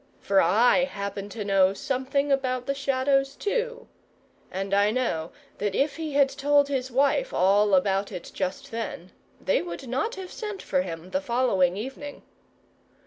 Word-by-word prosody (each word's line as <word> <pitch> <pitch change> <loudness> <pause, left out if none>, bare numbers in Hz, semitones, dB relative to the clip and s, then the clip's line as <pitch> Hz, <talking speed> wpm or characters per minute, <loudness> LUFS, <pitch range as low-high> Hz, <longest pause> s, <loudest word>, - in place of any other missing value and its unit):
For 195 -1 +3
I 245 +7 +4
happen 200 -4 -5
to 210 -1 -6
know 195 -1 +3
something 270 +4 -1
about 255 -2 0
the 275 - 0
Shadows 275 0 +1
too; 485 +3 -2 0.6
and 195 +1 -3
I 200 +1 +4
know 215 -9 -1 0.3
that 205 -1 -1
if 280 +2 +1
he 315 -3 -4
had 280 -1 +5
told 285 +1 +2
his 260 -2 -2
wife 280 - +2
all 200 +1 +4
about 195 +1 +1
it 175 - -7
just 185 +1 -4
then, 220 -6 -5 0.3
they 190 - +1
would 175 +8 -7
not 270 - -1
have 380 -1 -8
sent 420 -3 -6
for 185 - 0
him 175 0 -7
the 280 - 0
following 235 -9 +1
evening. 270 +6 -7
250 Hz, 160 wpm, -26 LUFS, 195-280 Hz, 0.6 s, had